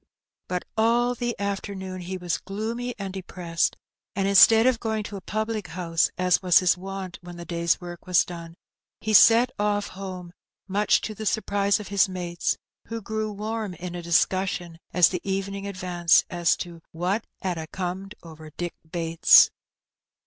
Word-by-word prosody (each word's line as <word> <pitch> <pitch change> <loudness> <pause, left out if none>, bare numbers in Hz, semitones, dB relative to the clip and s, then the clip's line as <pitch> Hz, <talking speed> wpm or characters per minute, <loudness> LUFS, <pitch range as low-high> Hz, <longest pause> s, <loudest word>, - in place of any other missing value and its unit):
But 180 -1 -3
all 235 +2 +2
the 240 0 -3
afcernoon 195 -2 -4
he 185 +2 -5
was 175 -2 -2
gloomy 230 +5 -4
and 195 -2 -5
depressed, 175 -3 -2 0.4
and 195 0 0
instead 220 +3 +7
of 255 -3 +3
going 220 -2 -2
to 205 - -7
a 195 - -7
pnblic 215 +2 -3
honse, 165 -2 0
as 180 -1 +2
was 180 -2 +5
his 180 -1 +4
wont 190 -1 -7
when 175 0 -10
the 170 - -8
day's 170 -1 0
work 175 -1 -9
was 180 -2 +4
done, 170 -1 -9 0.4
he 215 - -2
set 230 +4 +7
oflF 205 0 0
home, 185 -2 -8 0.3
mnch 205 +2 +2
to 215 - -4
the 215 +1 -5
surprise 205 -1 +1
of 210 - -8
hia 200 0 +3
mates, 175 -2 -2 0.3
who 230 0 -4
grew 220 0 -3
warm 210 -1 -4
in 175 +1 -7
a 175 - -5
discussion 175 0 0
as 180 -1 +5
the 180 -2 -4
evening 195 +1 -3
advanced 180 -3 +2
as 175 -2 +2
to 170 -2 -8
what 180 +6 -2 0.2
"'ad 180 -3 -2
a 160 - -6
comed 190 +3 -5
over 160 -2 -11
Dick 175 -1 -3 0.2
Bates." 165 -1 +6
190 Hz, 170 wpm, -25 LUFS, 175-210 Hz, 0.4 s, instead